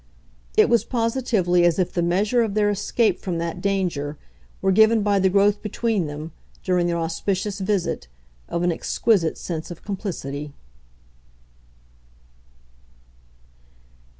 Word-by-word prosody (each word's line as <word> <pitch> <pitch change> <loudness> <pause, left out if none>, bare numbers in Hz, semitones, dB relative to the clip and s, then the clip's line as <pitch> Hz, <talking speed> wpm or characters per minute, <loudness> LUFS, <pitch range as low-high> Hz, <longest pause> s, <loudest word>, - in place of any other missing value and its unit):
It - - +6
was 235 -1 +3
positively 225 -7 +1
as 175 -2 +3
if 185 -2 0
the 175 - 0
measure 200 +8 +2
of 215 -3 -1
their 205 -1 +3
escape 210 +3 +1
from 180 -3 -3
that 170 +1 -4
danger 175 -7 -1 0.4
were 195 - +2
given 220 +2 +5
by 200 -1 +2
the 190 0 +3
growth 200 +2 +3
between 210 -4 -1
them, 150 +2 -7 0.3
during 180 -2 +1
their 170 0 0
auspicious 190 +4 -2
visit, 185 - -1 0.4
of 170 - -2
an 175 - +2
exquisite 170 0 +1
sense 165 -3 -5
of 175 - -9
complicity. 150 -8 -5
190 Hz, 125 wpm, -23 LUFS, 170-210 Hz, 0.4 s, It